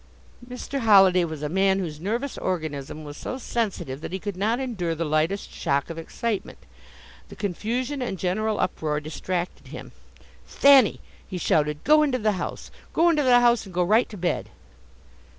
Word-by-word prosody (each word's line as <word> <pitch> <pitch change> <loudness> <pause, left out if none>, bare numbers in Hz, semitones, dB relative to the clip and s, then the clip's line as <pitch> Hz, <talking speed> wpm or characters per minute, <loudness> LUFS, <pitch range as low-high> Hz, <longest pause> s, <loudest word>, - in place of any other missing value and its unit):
Mr. 250 +3 -5
Holliday 195 -6 +6
was 155 -2 -6
a - - 0
man 190 +4 +2
whose 160 -6 -4
nervous 235 - -2
organism 155 -4 -4
was 145 -1 -8
so 255 - -5
sensitive 205 - -3
that - - -6
he 190 - -2
could 200 0 -5
not 220 +6 0
endure 195 -11 -2
the 165 +1 -2
lightest 155 +6 0
shock 140 +4 -1
of 165 - -6
excitement. 205 +4 -4 0.7
The - - -11
confusion 240 - -3
and 235 -6 -3
general 210 +4 -1
uproar 150 -4 -1
distracted 175 +4 -4
him. - - -9 0.6
"Thanny!" 275 -6 +5 0.3
he 185 - -5
shouted, 150 -3 0
"go 305 +1 +5
into 280 -4 +1
the 215 -3 +1
house! 185 -3 -5 0.2
Go 340 +1 +4
into 305 -2 +2
the 250 -3 +5
house 240 -3 +3
and 185 - -12
go 180 - +3
right 215 +7 +3
to 210 - -9
bed!" 175 -1 -2
195 Hz, 170 wpm, -25 LUFS, 165-235 Hz, 0.7 s, Holliday